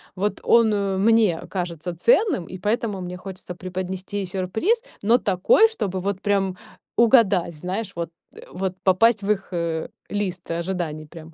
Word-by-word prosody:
вот 205 Hz, +3 st, -1 dB
он 205 Hz, -4 st, +3 dB
мне 220 Hz, -6 st, +4 dB
кажется 175 Hz, -2 st, -4 dB
ценным, 240 Hz, -, +3 dB
и 185 Hz, -, -8 dB
поэтому 210 Hz, 0 st, -1 dB
мне 180 Hz, 0 st, -6 dB
хочется 185 Hz, -1 st, -8 dB
преподнести 185 Hz, +2 st, -4 dB
сюрприз, 195 Hz, -, 0 dB, 0.2 s
но 230 Hz, +4 st, +5 dB
такой, 195 Hz, -, +4 dB
чтобы 195 Hz, -, -3 dB
вот 195 Hz, 0 st, -2 dB
прям 195 Hz, -3 st, 0 dB, 0.4 s
угадать, 215 Hz, -7 st, +4 dB
знаешь, 185 Hz, +6 st, -4 dB
вот 170 Hz, 0 st, -3 dB, 0.4 s
вот 185 Hz, 0 st, -2 dB
попасть 210 Hz, +4 st, +4 dB
в 200 Hz, -, -3 dB
их, 200 Hz, -2 st, -2 dB
э, 170 Hz, -2 st, -2 dB, 0.2 s
лист 190 Hz, -4 st, -3 dB
ожиданий 170 Hz, -3 st, -3 dB
прям. 160 Hz, +1 st, -12 dB
190 Hz, 145 wpm, -23 LUFS, 180-210 Hz, 0.4 s, но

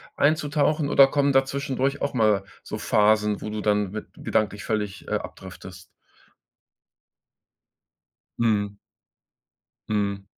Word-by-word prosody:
einzutauchen, 150 Hz, 0 st, +1 dB
oder 135 Hz, -2 st, +7 dB
kommen 140 Hz, 0 st, +1 dB
da 135 Hz, 0 st, +5 dB
zwischendurch 140 Hz, 0 st, -2 dB
auch 140 Hz, -, -1 dB
mal 110 Hz, -5 st, +2 dB, 0.2 s
so -, -, -6 dB
Phasen, 105 Hz, 0 st, +2 dB
wo 105 Hz, -, -5 dB
du 105 Hz, 0 st, -4 dB
dann 105 Hz, -2 st, +1 dB
mit 110 Hz, +1 st, -6 dB
gedanklich 105 Hz, -2 st, -1 dB
völlig, 105 Hz, -2 st, -3 dB
äh, -, -, -3 dB
abdriftest? -, -, -8 dB, 2.6 s
Mhm. 105 Hz, -3 st, 0 dB, 1.1 s
Mhm. 100 Hz, -2 st, -1 dB
110 Hz, 110 wpm, -25 LUFS, 105-140 Hz, 2.6 s, oder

